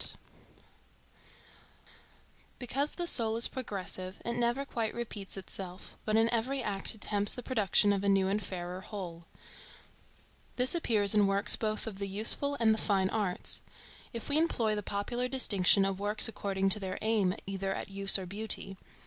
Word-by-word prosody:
ART - - +2 2.4
Because 275 +4 -2
the 350 - -3
soul 225 -9 +4
is 230 - +4
progressive, 190 -6 -5
it 235 - -2
never 240 +3 -1
quite 230 -5 -3
repeats 210 -5 -5
itself, 185 -1 -8
but 215 - 0
in 225 +1 +4
every 255 +3 -1
act 195 +1 0
attempts 205 -1 +1
the 250 - -7
production 210 -4 +2
of 200 0 -2
a 200 - +1
new 195 -1 +2
and 200 +2 -1
fairer 180 -1 -6
whole. 175 -5 -8 1.3
This 250 +1 +2
appears 220 - +4
in 205 -2 +4
works 195 +1 +4
both 215 -1 -3
of 205 -4 -7
the 200 - -3
useful 225 +8 +1
and 225 -2 +4
the 220 - -2
fine 190 -2 0
arts, 205 -5 -1 0.5
if 230 - -7
we 295 +1 +3
employ 240 -10 0
the 210 - -2
popular 210 +5 -3
distinction 200 -7 +3
of 195 -1 -2
works 210 +3 +4
according 195 -3 -2
to 200 - +6
their 190 -2 -5
aim 210 -4 +1
either 195 0 -4
at - - -5
use 195 0 +4
or 190 - -6
beauty. 195 0 -3
205 Hz, 165 wpm, -30 LUFS, 195-230 Hz, 2.4 s, to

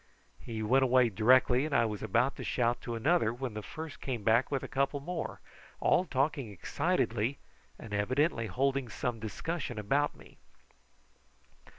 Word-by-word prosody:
He 110 -2 -5
went 130 +5 +4
away 125 -1 +4
directly, 125 +5 +4
and 150 -2 -2
I 115 - +4
was 105 -2 -4
about 125 +4 +1
to - - -6
shout 120 -1 0
to 120 - -4
another 125 0 +2
when 125 -1 -5
the 105 - -5
first 155 +7 -8
one - - -12
came 125 -6 -3
back 115 +4 +3
with 140 -2 -2
a - - -4
couple 140 +1 0
more, 175 +4 -5 0.4
all 185 - +3
talking 140 -4 -1
excitedly, 105 +6 -1 0.4
and 110 -3 -9
evidently 115 +4 +1
holding 135 +4 0
some 120 0 -3
discussion 120 +4 -4
about 140 +8 +1
me. - - -17
125 Hz, 165 wpm, -31 LUFS, 115-140 Hz, 0.4 s, went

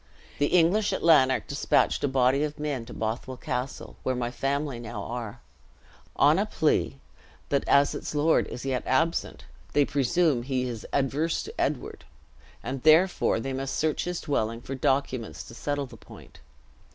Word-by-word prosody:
The 145 - +3
English 180 +6 +3
at - - -3
Lanark 140 -6 +5
dispatched 140 - +1
a - - +3
body 135 +1 +2
of 150 0 -3
men 145 -6 -3
to - - -10
Bothwell 115 +4 -4
Castle 125 +2 -4
(where 130 - -1
my 120 -1 -2
family 140 0 -2
now 115 -3 -6
are), 120 0 -6 0.7
on - - +4
a - - 0
plea, - - 0 0.5
that 140 - +1
as 140 0 +4
its - - -5
lord 150 +2 +3
is 125 - -7
yet 130 -2 0
absent, 165 +6 0 0.3
they 145 - +4
presume 145 0 +1
he 130 0 -1
is 115 -3 -6
adverse 140 +4 0
to 440 - -8
Edward, - - -3 0.6
and 130 0 -4
therefore 160 -3 +4
they 135 +4 -4
must 135 +1 -3
search 155 -1 0
his 180 0 -3
dwelling 115 -5 -1
for 135 - -6
documents 130 -3 -1
to 115 - -12
settle 145 +3 -2
the 130 - -13
point. - - -15
135 Hz, 165 wpm, -27 LUFS, 125-150 Hz, 0.7 s, Lanark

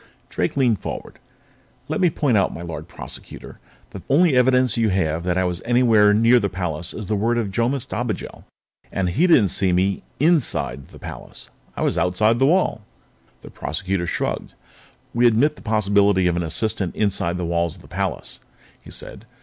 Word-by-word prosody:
Drake 90 - -2
leaned 120 -7 +2
forward. - - -7 0.7
"Let - - -2
me 180 - +5
point 145 -6 0
out, 100 - +2
my 85 - -8
Lord 85 -2 -7
Prosecutor, - - -9 0.3
that 95 -3 -10
the - - -5
only 165 -3 +4
evidence 125 -1 +3
you 115 -2 +2
have 85 -4 0
that 90 0 0
I 95 - +2
was 90 -1 -2
anywhere 115 -4 +4
near 115 +4 +5
the 100 -3 -1
palace 90 -3 -4
is 110 - -6
the 105 - -1
word 115 +4 +1
of 110 -4 -1
Jomis 120 +5 0
Dobigel. - - -4 0.5
And 95 -2 -1
he 155 - +2
didn't 125 - +5
see 95 0 +1
me 95 +2 +1 0.2
inside 150 - +1
the - - -15
palace. - - -9 0.3
I - - -1
was - - +1
outside 110 +6 +2
the 135 - +4
wall." 175 -9 +2 0.6
The - - -11
Prosecutor 90 +3 -3
shrugged. - - -3 0.6
"We 120 +1 +4
admit 125 +7 +3
the - - -15
possibility 100 -3 +2
of 90 -1 +2
an 85 - -1
assistant 95 +2 -2
inside 95 -4 0
the 90 - -3
walls 85 0 -1
of 90 - -17
the - - -15
palace," 95 +4 -4 0.4
he - - -14
said. 105 - -7
100 Hz, 185 wpm, -22 LUFS, 90-120 Hz, 0.7 s, me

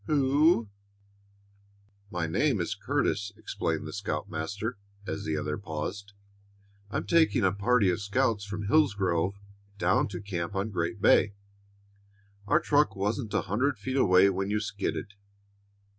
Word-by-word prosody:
"Who 145 -3 +3 0.8
" 100 0 -35
"My 85 - 0
name 80 - +1
is - - -1
Curtis," 100 +1 -1
explained - - -3
the - - -7
scoutmaster, 100 +8 -4 0.3
as 100 - -4
the 80 -1 -1
other 75 0 -3
paused. 100 +3 -5 0.8
"I'm 105 - -3
taking 165 -8 +3
a 95 - +4
party 100 0 +2
of 90 +4 -3
scouts 105 +1 0
from 105 +1 -5
Hillsgrove 100 - +2 0.4
down 95 0 +2
to 90 -4 -6
camp 90 -4 -4
on 100 +3 -1
Great 95 +3 -3
Bay. 100 -1 +5 1.1
Our - - +4
truck 145 0 +2
wasn't 105 +4 -2
a - - +3
hundred 125 +7 0
feet 130 +6 -4
away 95 -6 +5
when 95 +1 -2
you 105 +1 +1
skidded." 100 -1 -4
100 Hz, 140 wpm, -28 LUFS, 95-110 Hz, 1.1 s, Bay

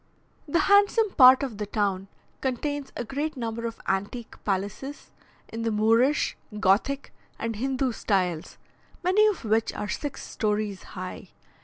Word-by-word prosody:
The 335 +4 +2
handsome 405 +1 +4
part 260 -3 +8
of 235 -7 -5
the 210 - -3
town 195 -2 -1 0.3
contains 275 +2 -2
a - - -3
great 290 +4 -3
number 230 -1 -3
of 230 - -8
antique 205 +5 -3
palaces, 205 +8 -3 0.4
in 225 - -5
the 230 - 0
Moorish, 225 +7 +3 0.2
Gothic, 225 +8 +1 0.2
and 230 -1 -3
Hindoo 265 +1 0
styles, 180 -7 -1 0.5
many 395 +4 +5
of 405 - -1
which 220 +1 +2
are 210 - -3
six 290 +7 -4
stories 210 -3 -2 0.2
high. 185 0 -7
230 Hz, 140 wpm, -26 LUFS, 210-275 Hz, 0.5 s, part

